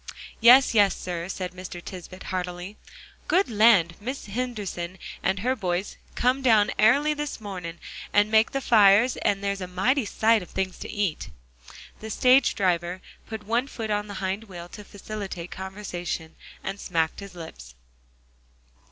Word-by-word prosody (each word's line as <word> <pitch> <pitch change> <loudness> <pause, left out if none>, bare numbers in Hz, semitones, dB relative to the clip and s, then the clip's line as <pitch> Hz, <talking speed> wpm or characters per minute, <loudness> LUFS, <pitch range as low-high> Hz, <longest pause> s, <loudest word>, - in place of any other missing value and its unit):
"Yes, 250 +3 +7
yes, 205 -3 +4
sir," 175 -1 -5
said 185 -1 -4
Mr. 185 -1 -8
Tisbett 185 +1 -9
heartily. 180 +2 -4 0.5
"Good 375 -6 +2
land! 205 -6 +5
Mis' 260 +6 -5
Henderson 205 -6 -4 0.3
had 190 +1 +1
her 255 +4 +1
boys 185 -3 -2 0.2
come 255 +2 +2
down 220 -5 +4
airly 280 +8 +4
this 295 -3 -4
mornin' 180 -5 -7 0.3
and 205 +1 +3
make 220 +1 +4
the 275 - -2
fires; 220 +1 +5
and 200 -1 0
there's 200 -1 -2
a 185 - -4
mighty 230 +9 +1
sight 220 +1 +3
of 180 - -10
things 190 -1 -3
to - - -7
eat." 200 -6 -2 0.7
The 220 - -7
stage 255 +4 +4
driver 180 -2 0 0.3
put 220 -2 -7
one 235 +5 0
foot 225 -5 -5
on 210 0 -1
the 205 - -7
hind 195 +4 -2
wheel 175 -4 -9
to 210 - -10
facilitate 200 -4 -7
conversation, 180 -4 -5 0.3
and 195 +1 -4
smacked 165 -5 -1
his 200 -2 -10
lips. 65 - -10
200 Hz, 155 wpm, -25 LUFS, 180-225 Hz, 0.7 s, Yes